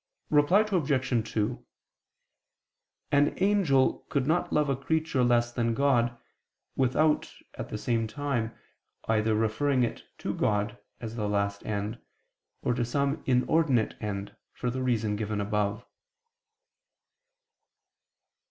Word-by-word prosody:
Reply 150 +7 +5
Obj. 135 - 0
2: 110 +3 -1 1.5
An 145 0 +4
angel 185 -10 +3
could 140 -4 0
not 160 +4 +1
love 150 -1 +2
a 135 - +1
creature 155 0 0
less 120 -1 +3
than 115 -1 0
God, 120 -4 +2 0.6
without, 145 +4 +2 0.2
at - - -6
the - - -4
same 115 0 0
time, 120 -1 -2 0.6
either 110 0 +2
referring 125 +5 +1
it 120 - -3
to - - -3
God, 105 0 0 0.2
as 115 -1 -6
the 105 -2 -1
last 100 0 -1
end, 105 +2 -3 0.6
or 125 - +1
to 120 0 0
some 140 +5 0
inordinate 130 -1 +2
end, 100 -1 -4 0.2
for 125 - -2
the 130 +1 -3
reason 110 -4 0
given 105 0 -2
above. 105 +1 -1
120 Hz, 120 wpm, -28 LUFS, 110-140 Hz, 1.5 s, Reply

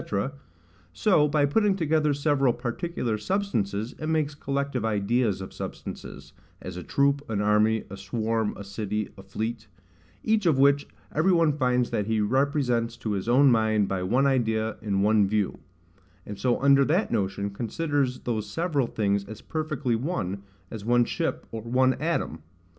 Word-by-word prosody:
—so, 150 - +3
by 145 -1 +2
putting 200 +7 +2
together 155 -4 +1
several 140 -2 +2
particular 120 -2 -3
substances, 115 - -1
it 155 - -4
makes 155 -2 0
collective 140 -3 -2
ideas 110 -1 +1
of 95 - -8
substances, - - -8 0.3
as 90 - -7
a 90 - -5
troop, 140 - +1
an 105 -3 -1
army, 105 +1 +3
a 100 - -8
swarm, 110 +2 -1
a 100 - -7
city, 105 +1 -3
a 100 - -11
fleet; 110 +4 -4 0.6
each 215 -4 +2
of 155 -5 +4
which 140 +1 +4 0.3
every 160 +5 +3
one 165 -4 +4
finds 125 -3 +1
that 105 -1 -1
he 110 -1 +1
represents 125 0 +1
to 110 -2 -4
his 100 +2 -2
own 135 +2 +6
mind 110 -3 +2
by 95 -1 -2
one 120 +9 +2
idea, 110 -5 +1
in 100 -2 0
one 105 -1 +4
view; 105 -1 -1 0.7
and 105 -1 -7
so 125 -2 +1
under 140 0 +6
that 170 +10 +1
notion 100 -2 -1
considers 130 +4 -1
those 110 -3 -3
several 155 - 0
things 100 -3 0
as 110 +1 -9
perfectly 155 -6 -2
one, 110 - -3 0.3
as 110 -3 -6
one 120 +2 +3
ship, - - -2
or 115 - -5
one 130 +3 +2
atom. 160 - -1
120 Hz, 160 wpm, -26 LUFS, 105-145 Hz, 0.7 s, own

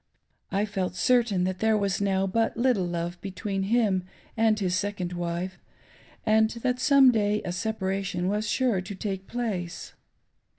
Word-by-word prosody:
I 200 +2 +1
felt 190 -4 -3
certain 230 -5 +2
that 185 0 -2
there 220 -1 +3
was 200 -1 0
now 195 -1 +1
but 225 +5 0
little 235 -7 +2
love 175 0 -4
between 195 +1 -3
him 215 -6 +2 0.3
and 220 -2 +3
his 185 -3 0
second 190 -3 -2
wife, 175 +1 -3 0.7
and 220 0 +4
that 250 +2 -2
some 275 -1 +6
day 210 -2 +1
a - - -2
separation 190 -1 -2
was 210 +2 -1
sure 240 -7 +1
to 200 +2 -7
take 190 -1 -4
place. 195 -8 -4
200 Hz, 155 wpm, -27 LUFS, 185-220 Hz, 0.7 s, some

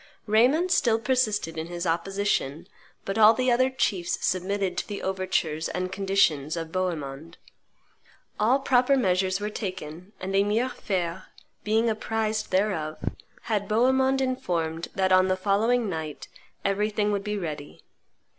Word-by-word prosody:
Raymond 255 - +3
still 235 -9 +3
persisted 215 -9 0
in 160 - -4
his 175 +1 -5
opposition; 175 -3 -1 0.4
but 195 +3 -2
all 220 +1 +8
the 255 +1 +1
other 255 +2 +3
chiefs 195 -9 -1
submitted 185 0 -1
to - - -5
the 205 -2 -6
overtures 185 -4 -1
and 185 0 -3
conditions 190 -6 +1
of 165 -1 -5
Bohemond. 165 -4 -4 1.0
All 230 +5 +4
proper 260 +1 +3
measures 185 -4 +1
were 210 +1 -3
taken, 185 -2 -6
and 190 +1 -3
Emir 210 +6 +2
Fein, 185 -6 -3 0.4
being 220 +2 +2
apprised 220 0 -1
thereof, 185 -6 0 0.5
had 205 -3 -1
Bohemond 265 +4 +3
informed 170 -11 -2
that 190 -1 +1
on 185 0 +5
the 185 0 +1
following 220 +5 +1
night 160 -5 -5 0.4
everything 210 +1 +1
would 200 -1 -1
be 210 0 -2
ready. 155 -6 -6
195 Hz, 135 wpm, -26 LUFS, 175-220 Hz, 1.0 s, all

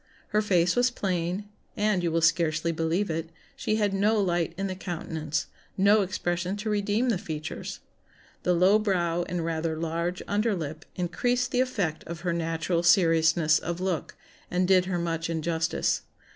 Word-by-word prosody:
Her 210 0 +2
face 180 -4 +2
was 245 +1 +4
plain, 185 -3 -2 0.3
and 210 -3 +2
(you 170 -1 0
will 165 +1 +1
scarcely 165 -1 +2
believe 165 +4 0
it) 165 +1 -3 0.3
she 215 - -1
had 205 -2 +1
no 210 +3 +2
light 175 -3 0
in 195 - -2
the 190 - -2
countenance, 160 -4 -3 0.3
no 200 +2 +5
expression 180 0 -2
to 215 +1 -3
redeem 210 +4 +1
the 210 -7 +1
features. 155 -2 -6 0.6
The 180 - +2
low 190 +5 +5
brow 175 -5 0
and 175 -2 -2
rather 160 -1 -1
large 170 +2 -2
under 210 +1 +1
lip 160 -1 -5
increased 245 +8 0
the 250 - +2
effect 200 -11 -1
of 170 0 -7
her 175 -1 -1
natural 165 +1 -1
seriousness 165 -2 +4
of 170 +1 -4
look, 185 -3 -2 0.3
and 180 0 +1
did 185 -1 +5
her 185 -1 -1
much 165 -1 -2
injustice. 165 0 0
175 Hz, 165 wpm, -27 LUFS, 165-200 Hz, 0.6 s, no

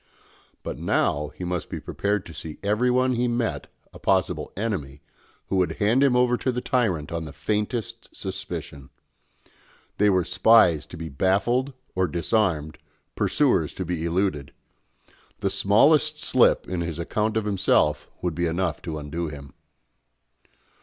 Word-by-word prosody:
But - - -5
now 75 +1 +1
he - - -7
must 90 -2 -3
be - - -4
prepared 100 -1 -2
to 80 - -10
see 80 0 -7
in - - -18
everyone 125 +5 +2
he 125 +1 +1
met 120 -1 -1 0.3
a - - -12
possible - - 0
enemy, 75 -11 -3 0.4
who 95 - -1
would 90 -1 +1
hand 110 +6 +2
him 135 -3 +4
over 125 0 +3
to 130 - -1
the 125 - -2
tyrant 100 -13 0
on 85 -1 -3
the 75 - -8
faintest 105 - -3
suspicion. 70 -2 -6 1.1
They 105 0 +5
were 95 -2 +3
spies 95 -7 +4
to 85 - -10
be 80 0 -6
baffled 100 - +1 0.2
or 95 0 +1
disarmed, 85 -5 0 0.4
pursuers - - +1
to 95 - -4
be 85 -2 -3
eluded. 85 -4 -1 0.8
The 100 - -1
smallest 105 +10 +4
slip - - +3
in 90 -1 -2
his 85 -2 -4
account 105 +6 -1
of 110 - -1
himself 75 -7 +1
would 90 -2 0
be 85 +2 0
enough 85 -1 -1
to 80 -2 -5
undo 75 +3 -4
him. 70 -2 -9
95 Hz, 155 wpm, -25 LUFS, 80-110 Hz, 1.1 s, They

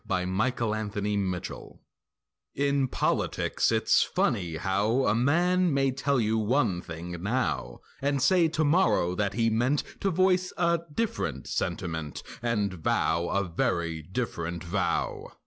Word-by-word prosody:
A 90 -1 0
RONDEAU 110 +4 0
OF 110 -1 -3
STATESMANSHIP 100 -3 -3 0.8
In 140 -1 +1
politics - - 0
it's - - +3
funny 90 -8 0
how 100 +9 +1
A 105 - +3
man 175 +9 +2
may 135 -1 +2
tell 135 +1 0
you 110 0 +1
one 110 -5 +1
thing 85 +1 -7
now 80 - -2 0.2
And 140 0 +1
say 165 +5 +4
tomorrow 155 - +2
that 100 +1 -1
he 115 -1 +2
meant 125 +6 +1 0.2
To 195 - +1
voice 185 +1 +2
a 170 -1 +2
different 225 +8 -2
sentiment 80 -4 -3 0.2
And 105 -5 0
vow 85 0 0
a 100 - 0
very 85 -2 -1
different 85 -2 -4
vow. 90 +2 -2
110 Hz, 130 wpm, -28 LUFS, 90-140 Hz, 0.8 s, say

